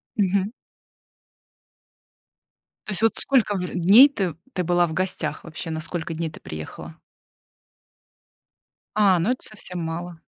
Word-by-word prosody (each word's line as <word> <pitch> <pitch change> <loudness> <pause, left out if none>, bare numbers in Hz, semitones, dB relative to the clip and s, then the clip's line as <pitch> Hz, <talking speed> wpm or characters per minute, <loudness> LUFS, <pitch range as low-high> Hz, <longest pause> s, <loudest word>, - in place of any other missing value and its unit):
Мгм. 200 0 +1 2.3
То 215 - -5
есть, 205 - -2
вот 225 - +3
сколько 240 -7 +2
в 180 -1 -2
дней 200 +10 +7
ты 190 - -2 0.2
ты 180 - -1
была 175 0 +3
в 160 - -5
гостях 185 +1 -2
вообще? 165 0 -6
На 160 0 -3
сколько 165 0 -4
дней 160 0 -3
ты - - -12
приехала? 80 - -8 2.0
А, 195 -4 +4
ну 185 +8 0
это 255 - -2
совсем 185 -4 -6
мало. 165 +1 -5
180 Hz, 135 wpm, -24 LUFS, 165-205 Hz, 2.3 s, дней